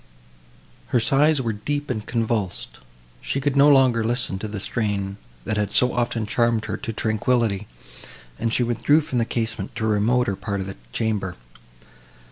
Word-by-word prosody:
Her 125 Hz, -, +2 dB
sighs 140 Hz, +4 st, +3 dB
were 115 Hz, -2 st, -1 dB
deep 145 Hz, +7 st, -3 dB
and 110 Hz, -4 st, -3 dB
convulsed; 115 Hz, -5 st, -2 dB, 0.4 s
she 140 Hz, -, -2 dB
could 140 Hz, 0 st, 0 dB
no 140 Hz, +1 st, +7 dB
longer 130 Hz, -5 st, +5 dB
listen 120 Hz, -4 st, -1 dB
to 110 Hz, -, -4 dB
the 105 Hz, -1 st, -5 dB
strain, 100 Hz, -2 st, -2 dB, 0.3 s
that 105 Hz, -, -1 dB
had 105 Hz, -1 st, 0 dB
so 125 Hz, 0 st, +3 dB
often 120 Hz, -2 st, 0 dB
charmed 115 Hz, +1 st, +1 dB
her -, -, -3 dB
to 115 Hz, -, -5 dB
tranquillity, 110 Hz, -1 st, 0 dB, 0.7 s
and 115 Hz, -, 0 dB
she 125 Hz, -, +2 dB
withdrew 130 Hz, +6 st, +3 dB
from 130 Hz, -5 st, -2 dB
the 115 Hz, -, +2 dB
casement 115 Hz, -1 st, -3 dB
to 115 Hz, -2 st, -2 dB
a -, -, +1 dB
remote 105 Hz, -1 st, +1 dB
part 100 Hz, -2 st, -2 dB
of 95 Hz, -, -3 dB
the 95 Hz, -, -7 dB
chamber. 105 Hz, -, -1 dB
115 Hz, 170 wpm, -23 LUFS, 105-125 Hz, 0.7 s, no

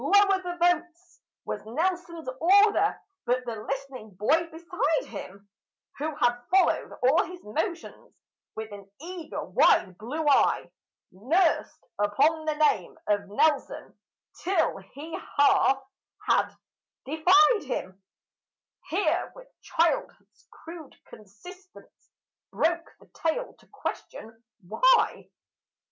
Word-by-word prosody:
"'Lower 395 Hz, +3 st, +4 dB
the 355 Hz, -1 st, -5 dB
boats!' 350 Hz, +1 st, -1 dB, 0.2 s
was -, -, -5 dB
Nelson's 335 Hz, +5 st, -3 dB
order." 405 Hz, +5 st, +4 dB, 0.3 s
But 250 Hz, +1 st, 0 dB
the 235 Hz, -2 st, -4 dB
listening 265 Hz, -3 st, -6 dB
boy 310 Hz, -, +2 dB
beside 345 Hz, +9 st, -1 dB
him, 200 Hz, +2 st, -10 dB, 0.5 s
Who 305 Hz, +1 st, -3 dB
had 245 Hz, -4 st, +1 dB
followed 375 Hz, 0 st, +2 dB
all 270 Hz, +6 st, +4 dB
his 360 Hz, 0 st, -10 dB
motions 330 Hz, -, -5 dB, 0.4 s
with 220 Hz, 0 st, -6 dB
an 200 Hz, -1 st, -11 dB
eager 340 Hz, +1 st, -6 dB
wide 185 Hz, -2 st, +3 dB
blue 295 Hz, +8 st, -4 dB
eye, 285 Hz, -, +3 dB, 0.4 s
Nursed 315 Hz, -, 0 dB
upon 290 Hz, +10 st, +2 dB
the 310 Hz, -1 st, 0 dB
name 290 Hz, -, +1 dB
of 205 Hz, -1 st, 0 dB
Nelson 285 Hz, +7 st, 0 dB, 0.5 s
till 355 Hz, -, +1 dB
he 285 Hz, +12 st, -9 dB, 0.2 s
half 270 Hz, -1 st, +4 dB, 0.4 s
had -, -, +3 dB, 0.6 s
deified 370 Hz, -, +4 dB
him, 190 Hz, -7 st, -5 dB, 0.9 s
Here, 385 Hz, +5 st, 0 dB
with -, -, -14 dB
childhood's 340 Hz, +10 st, -2 dB
crude 330 Hz, -3 st, -11 dB
consistence, 355 Hz, -, -15 dB, 0.4 s
broke 335 Hz, +1 st, 0 dB
the -, -, -20 dB
tale 330 Hz, +10 st, -2 dB
to -, -, -25 dB
question 225 Hz, +1 st, -7 dB, 0.2 s
"Why?" -, -, +3 dB
315 Hz, 110 wpm, -27 LUFS, 240-355 Hz, 0.9 s, Lower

